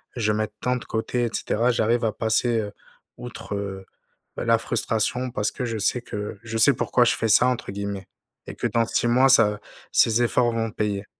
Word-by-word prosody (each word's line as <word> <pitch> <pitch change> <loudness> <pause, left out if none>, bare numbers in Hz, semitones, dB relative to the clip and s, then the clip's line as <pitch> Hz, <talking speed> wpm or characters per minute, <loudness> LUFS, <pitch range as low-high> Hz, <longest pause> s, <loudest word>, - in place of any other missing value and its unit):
je 110 -3 0
mette 110 0 -2
tant 125 0 0
de 125 - -9
côté 120 +2 -2
et - - -1
cetera, 120 +3 0
j'arrive 115 +1 +1
à 110 - +1
passer, 115 +1 +1
heu, 105 -1 -4 0.5
outre, 120 -4 -7
heu, 95 -1 -5 0.5
bah, - - -3
la - - +4
frustration 125 +3 -1
parce 105 -2 -1
que 125 - -4
je 115 -2 -3
sais 120 +4 0
que 105 -3 -6
«je 115 0 -4
sais 135 +5 +6
pourquoi 125 +1 +2
je - - +2
fais 115 - -1
ça» 115 +4 +5
entre 125 -5 -2
guillemets 100 -1 -5 0.4
et - - -7
que - - -1
dans 115 -1 +1
6 120 - 0
mois, 125 +3 +4
ça 105 -5 +4 0.3
ces 115 +1 +3
efforts 120 0 +2
vont 115 -1 -2
payer. 100 -1 -2
115 Hz, 210 wpm, -24 LUFS, 105-120 Hz, 0.5 s, sais